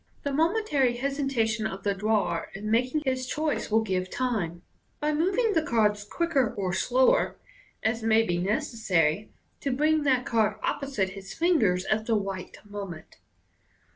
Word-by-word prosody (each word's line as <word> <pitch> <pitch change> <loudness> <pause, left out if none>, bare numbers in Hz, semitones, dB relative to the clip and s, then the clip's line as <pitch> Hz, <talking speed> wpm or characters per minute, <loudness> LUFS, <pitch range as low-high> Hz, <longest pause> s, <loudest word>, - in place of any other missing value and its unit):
The 285 - -2
momentary 310 - +2
hesitation 245 -5 0
of 195 -2 -7
the 200 - +1
drawer 200 -4 0
in 210 +2 -4
making 255 +6 +1
his 260 -1 -1
choice 305 +1 -1
will 220 +1 +3
give 185 -3 -1
time, 190 -10 -2 0.4
by 300 +1 0
moving 390 +8 +2
the 325 - +3
cards 210 -7 +1
q 340 - 0
:ker 270 -9 +1
or 185 -3 -2
slower, 255 +7 +3 0.5
as 225 +1 0
may 225 0 +4
be 175 -5 -1
necessary, 200 - 0 0.3
to 280 - -2
bring 305 +4 +2
that 260 -3 +2
card 225 -3 +2
opposite 270 -9 -1
his 195 0 -9
fingers 225 - +2
at 220 0 0
the 230 - +2
right 195 -2 -5
moment. 200 -6 -8
225 Hz, 155 wpm, -27 LUFS, 200-280 Hz, 0.5 s, may